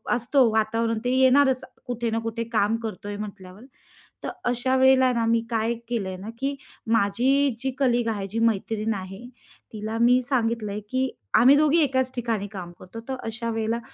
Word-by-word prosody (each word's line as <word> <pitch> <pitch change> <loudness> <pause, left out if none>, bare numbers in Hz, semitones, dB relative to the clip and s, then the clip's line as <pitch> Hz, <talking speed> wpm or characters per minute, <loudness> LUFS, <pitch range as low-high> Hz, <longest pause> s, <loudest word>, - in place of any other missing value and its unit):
असतो 245 +1 +3
वातावरण 225 +1 +1
ते 250 - 0
येणारच 260 0 +4 0.2
कुठे 240 -2 -2
ना 225 - 0
कुठे 230 0 -3
काम 215 0 +2
करतो 205 -2 -6
आहे 205 0 -4
म्हटल्यावर. 195 -1 -9 0.6
तर - - -3 0.2
अशा 245 +2 0
वेळेला 260 -1 +5
ना 230 -1 0
मी 230 0 +2
काय 225 0 0
केलं 230 -5 -2
आहे 185 - -6
ना, 200 +4 -8
की 275 +1 -1 0.4
माझी 245 +5 +2
जी 265 0 -2
कलीग 245 -3 +2
आहे, 200 -3 -3
जी 225 +4 -3
मैत्रीण 220 0 0
आहे, 195 +3 -7 0.5
तिला 215 +1 -4
मी 250 +2 +5
सांगितलं 230 -5 0
आहे, 210 - -3
की 260 0 0 0.3
आम्ही 255 +5 +7
दोघी 305 +2 +4
एकाच 260 -2 0
ठिकाणी 225 -4 -2
काम 185 -4 -8
करतो. 205 +5 -10
तर 265 - -1
अशा 230 +1 -4
वेळेला, 225 +1 -1
230 Hz, 180 wpm, -25 LUFS, 215-255 Hz, 0.6 s, आम्ही